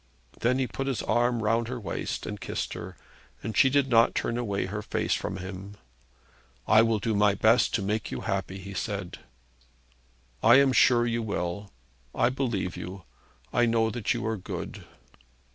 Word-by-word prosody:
Then 125 +2 +2
he 135 - +1
put 135 +2 -4
his 130 -5 -1
arm 120 -1 +1
round 115 +2 +1
her 125 0 -4
waist 95 -7 -4
and 105 -1 -6
kissed - - -3
her, - - -8 0.5
and 110 - -4
she 135 - +5
did 140 0 +2
not 115 -2 +4
turn 115 - -1
away 105 -6 -1
her 105 +3 -4
face 105 - -1
from 95 - -3
him. 95 +2 -8 0.9
'I 110 - +7
will 115 -1 +2
do 110 +2 -1
my 105 -1 +3
best 115 +4 +4
also 100 - 0
to - - -3
make 105 +1 -1
you - - -5
happy,' 95 -1 -3
he 100 +1 -8
said. 100 -2 -4 1.2
'I 120 +3 +7
am 135 -1 +5
sure 120 -2 +5
you 115 0 -1
will. 100 -2 -3 0.4
I - - +3
believe 120 -9 -2
you. 90 +2 -7 0.5
I 120 0 +3
know 115 -1 +2
that 115 -1 -2
you - - -1
are 110 0 -1
good.' 95 - -7
110 Hz, 180 wpm, -27 LUFS, 100-120 Hz, 1.2 s, I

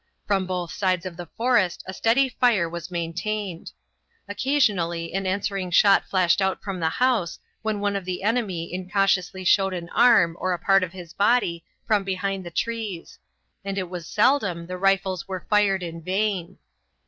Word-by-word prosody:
From 195 -2 0
both 180 -2 -3
sides 185 -2 0
of 180 -2 -6
the 175 -1 -8
forest 230 -7 +1
a 190 - -6
steady 235 +7 +3
fire 240 -8 +2
was 170 0 -7
maintained. 180 +2 -4 0.6
Occasionally 200 -9 0
an 195 0 -1
answering 190 -1 -2
shot 195 +3 +5
flashed 185 0 +2
out 190 0 -1
from 195 -2 -4
the 160 -1 +1
house 230 -4 0 0.2
when 220 -2 -2
one 205 0 -1
of 200 - -2
the 180 +1 -4
enemy 200 -7 -1
incautiously 185 0 0
showed 195 +1 +3
an 170 -1 -6
arm 205 -9 +4
or 185 - 0
a - - -2
part 195 +2 +4
of 180 -1 -3
his 175 -3 -10
body 200 -5 +1 0.2
from 210 -2 +2
behind 195 0 -2
the 175 - -7
trees, 215 -2 -4 0.4
and 195 0 -4
it 185 -2 -3
was 175 -3 -6
seldom 205 -7 +1
the 180 +2 -6
rifles 195 -1 +1
were 190 -2 -6
fired 200 -3 +3
in 165 -1 -6
vain. 190 0 -2
190 Hz, 170 wpm, -24 LUFS, 175-205 Hz, 0.6 s, shot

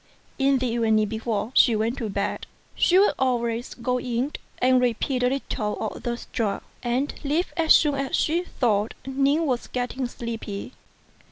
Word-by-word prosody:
In 275 0 +4
the 255 - -1
evening 225 -2 +2
before 220 0 -2
she 235 -3 +5
went 225 +5 -1
to 225 -4 -3
bed, 200 0 -2 0.3
she 360 - +3
would 400 +2 +5
always 240 -2 0
go 250 +1 -1
in 250 +4 -2 0.2
and 255 0 +4
repeat 250 +2 0
a 250 - +3
little 250 -5 -2
of 220 - -4
the 240 -1 -2
sutra, 215 -4 -3 0.2
and 255 +4 -1
leave 305 +5 0
as 330 -2 +6
soon 295 -2 +3
as 275 -1 -1
she 330 +3 +1
thought 220 - 0
Ning 275 +4 +1
was 255 -4 -1
getting 250 +1 -2
sleepy. 230 -3 -6
245 Hz, 165 wpm, -25 LUFS, 225-275 Hz, 0.3 s, as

